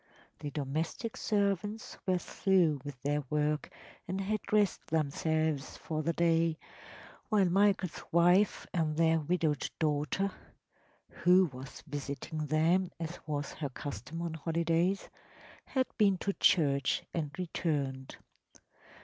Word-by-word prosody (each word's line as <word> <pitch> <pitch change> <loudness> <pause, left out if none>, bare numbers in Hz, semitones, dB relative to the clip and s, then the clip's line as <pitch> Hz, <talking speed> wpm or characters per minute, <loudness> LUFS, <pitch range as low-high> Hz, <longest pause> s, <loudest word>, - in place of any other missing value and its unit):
The 145 0 -4
domestic 155 - -3
servants 205 0 -1
were 185 -1 +3
through 175 -6 +2
with 145 -3 -7
their 145 +1 +1
work 150 0 0 0.4
and 185 +2 -2
had 205 +1 -1
dressed 210 -3 +1
themselves 155 -1 0
for 155 -1 -3
the 170 - +1
day, 165 -1 +2 0.7
while 210 -4 +4
Michael’s 190 -1 +2
wife 175 +4 +4
and 155 -4 0
their 165 0 +4
widowed 155 -2 0
daughter 155 +5 0 0.8
(who 180 -2 +4
was 130 +2 -9
visiting 145 +1 -4
them, 170 +5 +3
as 165 +1 -5
was 145 -1 -3
her 145 -3 -4
custom 145 +4 -6
on 170 -2 -3
holidays) 170 +4 0 0.6
had 260 -1 +1
been 200 -3 +5
to 200 +2 -1
church 140 -8 +3
and 155 -3 -1
returned. 145 -7 -2
165 Hz, 120 wpm, -32 LUFS, 150-185 Hz, 0.8 s, been